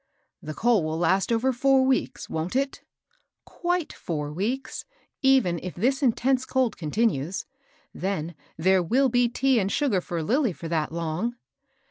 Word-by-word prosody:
"The 155 0 -7
coal 230 -6 +3
will 155 +1 -2
last 185 +5 +2
over 245 +3 +2
four 265 +2 +3
weeks, 260 -1 0
wont 160 +7 -3
it?" 275 +1 -1 0.3
" - - -44 0.2
Quite 350 -2 0
four 150 -3 -4
weeks, 245 - -3 0.4
even 260 -11 +3
if 185 - -6
this 260 +9 +1
intense 260 0 +2
cold 260 -4 0
continues. 170 - -1 0.5
Then 175 -3 -3 0.2
there 185 +3 +3
will 255 +10 +2
be 245 0 +3
tea 265 +1 +2
and 195 -1 -1
sugar 255 -11 +1
for 170 -2 -4
Lilly 245 - +1
for 165 - -8
that 160 -2 -1
long." 170 +8 -2
225 Hz, 155 wpm, -26 LUFS, 170-260 Hz, 0.5 s, coal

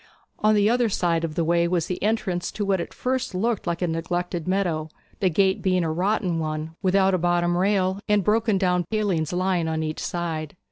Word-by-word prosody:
On 215 0 +3
the 205 0 +4
other 240 0 +2
side 170 -4 0
of 160 -2 -3
the 170 - +1
way 170 +1 +2
was 170 -2 0
the 180 - -4
entrance 195 -5 -1
to 205 - -2
what 195 -2 +1
at - - -6
first 255 -3 -2
sight 180 - -2
looked 225 -2 -1
like 170 +1 -1
a - - +1
neglected 175 +1 -3
meadow, 175 -5 0 0.3
the 190 - +2
gate 190 +2 +2
being 185 -2 +2
a 160 - -1
rotten 180 0 0
one, 155 0 -3
without 190 0 +3
a 185 - +2
bottom 175 0 +1
rail, 190 0 +1
and 210 -1 +3
broken 215 +1 +2
down 180 -2 +1
palings 190 -6 -1
lying 180 -2 0
on 160 0 -1
each 155 0 -3
side. 165 -3 -3
180 Hz, 215 wpm, -24 LUFS, 170-200 Hz, 0.3 s, the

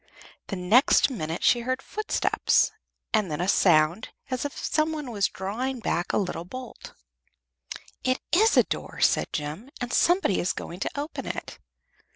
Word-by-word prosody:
The 195 - -4
next 215 +10 +4
minute 165 -7 -4
she 240 - +5
heard 255 +2 -2
footsteps, 425 +9 +1 0.4
and 215 -5 +2
then 150 0 -3
a 180 - -1
sound, 170 +1 +3 0.2
as 255 +2 -2
if 285 - -5
some 310 0 0
one 295 -5 -5
was 200 -3 +1
drawing 240 +7 -4
back 175 -5 -1
a - - +1
little 180 -4 -2
bolt. 250 +7 -9 1.1
"It 255 0 +1
is 435 +6 +4
a - - +7
door," - - -5
said - - +3
Jem, 155 - -5
"and 245 0 -4
somebody 350 - +3
is 175 - 0
going 175 - -7
to 285 - -3
open 295 +3 -5
it." - - -6
230 Hz, 165 wpm, -26 LUFS, 180-265 Hz, 1.1 s, a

